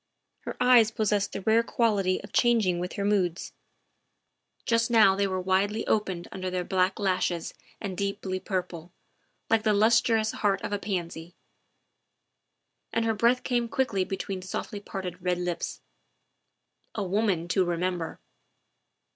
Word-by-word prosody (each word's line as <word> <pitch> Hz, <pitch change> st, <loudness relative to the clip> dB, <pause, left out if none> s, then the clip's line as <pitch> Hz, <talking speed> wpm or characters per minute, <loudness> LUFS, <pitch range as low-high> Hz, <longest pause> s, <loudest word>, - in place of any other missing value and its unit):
Pier -, -, -6 dB
eyes 245 Hz, -3 st, +6 dB
possessed 210 Hz, -2 st, 0 dB
the -, -, -5 dB
rare 220 Hz, +3 st, +4 dB
quality 205 Hz, -6 st, +1 dB
of -, -, -12 dB
changing 220 Hz, -8 st, +3 dB
with 180 Hz, +1 st, -4 dB
her 200 Hz, -, -2 dB
moods; 190 Hz, -4 st, 0 dB, 1.1 s
just 230 Hz, 0 st, +2 dB
now 220 Hz, -5 st, +6 dB
they 200 Hz, 0 st, +1 dB
were 185 Hz, -1 st, -2 dB
widely 195 Hz, +4 st, 0 dB
opened 190 Hz, -5 st, -1 dB
under 185 Hz, -1 st, -4 dB
their 180 Hz, 0 st, -2 dB
black 185 Hz, +1 st, +1 dB
lashes 185 Hz, -4 st, -1 dB, 0.3 s
and 195 Hz, -3 st, -5 dB
deeply 200 Hz, -1 st, -3 dB
purple, 180 Hz, -3 st, -4 dB, 0.6 s
like 225 Hz, -1 st, +3 dB
the 215 Hz, -1 st, +2 dB
lustrous 220 Hz, +1 st, +3 dB
heart 200 Hz, -2 st, 0 dB
of -, -, -3 dB
a 205 Hz, -, -1 dB
pansy, 175 Hz, -4 st, -5 dB, 1.6 s
and 230 Hz, 0 st, 0 dB
her 225 Hz, -, +2 dB
breath 235 Hz, +4 st, +2 dB
came 240 Hz, -2 st, 0 dB
quickly 225 Hz, -8 st, 0 dB
between 190 Hz, 0 st, -4 dB
softly 185 Hz, +2 st, -5 dB
parted 185 Hz, -3 st, -6 dB
red 180 Hz, 0 st, 0 dB
lips. 175 Hz, -1 st, -4 dB, 1.1 s
A 210 Hz, -, -1 dB
woman 190 Hz, -3 st, 0 dB
to 185 Hz, +1 st, +3 dB
remember 175 Hz, -1 st, -2 dB
195 Hz, 140 wpm, -27 LUFS, 185-220 Hz, 1.6 s, eyes